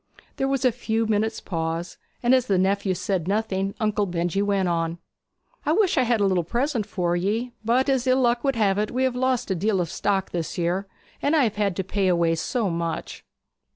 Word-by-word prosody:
There 270 - 0
was 270 -1 0
a 255 - +5
few 225 -1 -1
minutes' 220 +1 0
pause, 165 0 -4 0.2
and 240 +2 +4
as 255 -1 +3
the 195 - +2
nephew 195 0 +1
said 180 -1 -2
nothing 195 -1 -1
Uncle 210 -2 +1
Benjy 175 +2 -1
went 200 -2 +1
on: 165 -1 -1 0.7
'I 305 - +1
wish 390 0 +3
I - - +4
had 240 -2 +2
a 200 - +3
little 185 -3 +2
present 235 - -1
for 175 -4 -1
ye. 215 +7 -1
But 245 +4 +2
as 265 -2 +1
ill 255 +1 +4
luck 240 -1 +2
would 275 -2 +1
have 205 -3 +2
it 210 - 0
we 255 +2 -1
have 260 -1 +1
lost 250 -3 0
a - - +3
deal 195 +2 +1
of 170 -2 -2
stock 195 -2 -1
this 170 -2 -3
year, 180 +3 -1 0.3
and 290 +3 +2
I 300 - +4
have 220 -3 -1
had 200 -3 +1
to 190 - -1
pay 195 +1 0
away 170 -2 +3
so 210 +7 -1
much.' 165 0 -4
205 Hz, 220 wpm, -24 LUFS, 180-245 Hz, 0.7 s, a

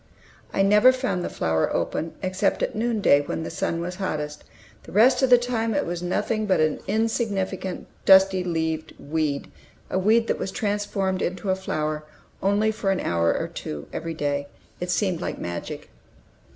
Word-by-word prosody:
I 195 - +2
never 210 +5 +6
found 255 -9 -2
the - - -2
flower 80 -1 0
open 165 - -2
except 185 0 0
at - - -1
noonday, 215 -10 +3
when 155 +2 -4
the - - -5
sun 190 -3 -2
was 180 +1 -5
hottest. 150 -6 -3 0.4
The - - -13
rest 235 +7 +5
of 265 - +3
the 245 - +8
time 230 -3 -1
it - - +1
was 175 0 -3
nothing 215 +4 -1
but 190 - +3
an 155 -1 +2
insignificant, 205 -5 -1 0.2
dusty 190 -1 +6
leaved 160 -2 -2
weed, 150 -1 -2 0.4
a 185 - +1
weed 220 +4 +4
that - - -1
was - - -2
transformed 200 -2 -1
into 185 +2 -1
a - - +2
flower 155 -5 -2 0.4
only 205 +3 +2
for 215 -2 -2
an 190 -1 +1
hour 85 -1 +1
or - - -2
two 75 -1 -6
every 165 -1 -4
day. 145 -2 -1 0.3
It 180 - -4
seemed 180 -2 0
like - - -3
magic. 85 0 -6
190 Hz, 175 wpm, -24 LUFS, 160-210 Hz, 0.4 s, the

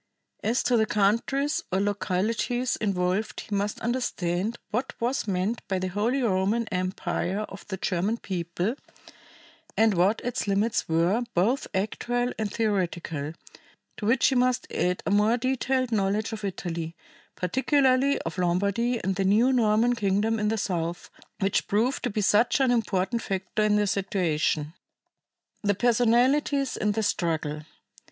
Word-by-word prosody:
As 235 +3 +1
to 245 -1 +3
the 220 -1 +2
countries 235 +9 +1
or 190 - +1
localities 210 +5 0
involved 190 0 -1
he 205 - -4
must 205 +1 -1
understand 220 -4 -1
what 240 +5 -2
was 240 0 -1
meant 195 +4 -1
by 190 - 0
the 185 0 -2
Holy 230 +8 0
Roman 210 +2 +1
Empire 185 +1 -2
of 195 -2 -8
the 190 - -4
German 190 +4 -1
people 180 +1 -2 1.0
and 220 -1 +4
what 185 +5 +2
its 245 -3 -2
limits 205 +1 0
were, 170 +8 +2
both 220 +10 +1
actual 245 +5 -1
and 215 -2 -2
theoretical; 175 -8 -2 0.6
to 210 - -5
which 240 +3 +3
he - - 0
must 250 0 +2
add 180 0 0
a - - 0
more 210 +4 +3
detailed 255 0 0
knowledge 210 +1 0
of 215 -1 -6
Italy, 170 -4 -4 0.4
particularly 265 - +2
of 165 +3 -5
Lombardy 200 +7 +1
and 190 -1 -1
the 195 - +1
new 220 +7 +4
Norman 230 0 +3
kingdom 215 0 +1
in 210 - 0
the 220 +1 0
South, 175 -4 -3 0.3
which 195 0 +1
proved 230 +6 +1
to 245 - -1
be 210 -1 -1
such 210 +7 +3
an 265 -2 +3
important 225 -1 0
factor 195 +1 -2
in 210 0 +3
the 210 0 +3
situation. 170 -6 0 0.9
The 205 -1 +1
Personalities 245 +5 +2
in 210 -1 0
the 220 +1 -1
Struggle. 160 -6 -1
210 Hz, 145 wpm, -26 LUFS, 185-235 Hz, 1.0 s, and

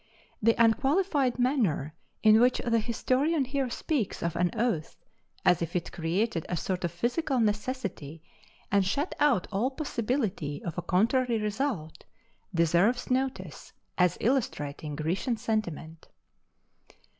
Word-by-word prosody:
The 230 +1 +4
unqualified 270 - +2
manner 230 - +1 0.3
in 215 0 +7
which 250 +1 +4
the 230 -1 +3
historian 260 +6 +1
here 265 0 -1
speaks 245 - -2
of 170 -1 -1
an 175 0 +2
oath, 215 -9 -1 0.5
as 180 -2 +4
if 170 +1 -3
it 175 - -2
created 175 +2 -1
a 175 - -1
sort 185 +3 -2
of 175 - -1
physical 250 - -1
necessity 210 - -2 0.5
and 200 0 +4
shut 280 - -1
out 265 -11 +3
all 210 +6 +1
possibility 230 - -2
of 170 - -4
a 175 - -2
contrary 230 +7 +2
result, 210 - -3 0.5
deserves 180 +9 +2
notice 260 +1 -2 0.2
as 180 -1 +2
illustrating 150 - -1
Grecian 175 - -1
sentiment. 170 -8 -3
215 Hz, 125 wpm, -28 LUFS, 175-255 Hz, 0.5 s, in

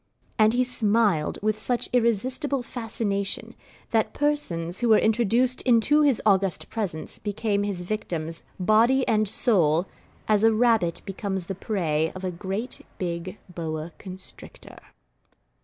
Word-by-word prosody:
And 215 +1 +5
he 250 +1 +3
smiled 215 -8 +1
with 215 0 0
such 240 +2 0
irresistible 250 +4 +1
fascination, 220 -5 -3 0.4
that 220 -1 +1
persons 185 - -1
who 240 - +1
were 220 - +7
introduced 235 +3 +2
into 255 +5 +4
his 280 -6 +3
august 195 -4 +1
presence 190 -8 -4
became 205 0 -1
his 200 -3 -3
victims, 170 -5 -3 0.2
body 230 +7 +3
and 215 -1 +2
soul, 175 - +3 0.4
as 215 -1 +3
a 225 - +6
rabbit 220 -6 +2
becomes 195 -2 -3
the 195 - -4
prey 165 -6 -1
of 185 - -8
a 185 - -1
great 195 +7 -5
big 175 +2 -4
boa 160 -2 -5
constrictor. 185 -1 -9
210 Hz, 130 wpm, -25 LUFS, 180-235 Hz, 0.4 s, were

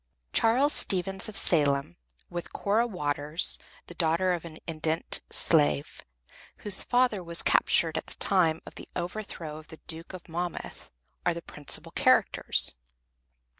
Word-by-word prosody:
Charles 255 +6 +3
Stevens 190 +2 +1
of 215 - +1
Salem, 140 - +3 0.3
with 175 0 -7
Cora 220 +4 0
Waters, 150 -4 +1 0.3
the - - -11
daughter 170 +2 +1
of 175 -1 -5
an 160 -2 -10
indented 160 0 -1
slave, 75 -1 +1 0.6
whose 200 -2 +5
father 245 -6 +1
was 170 0 +2
captured 160 -1 +3
at - - -13
the - - -4
time 165 -5 +1
of - - -11
the - - -11
overthrow 175 -4 -6
of 155 - -16
the 160 - -11
Duke 165 +2 -2
of 185 - -10
Monmouth, 175 +1 -6 0.3
are 175 - 0
the 170 - -6
principal 145 -2 -2
characters. - - +2
170 Hz, 140 wpm, -27 LUFS, 160-190 Hz, 0.6 s, whose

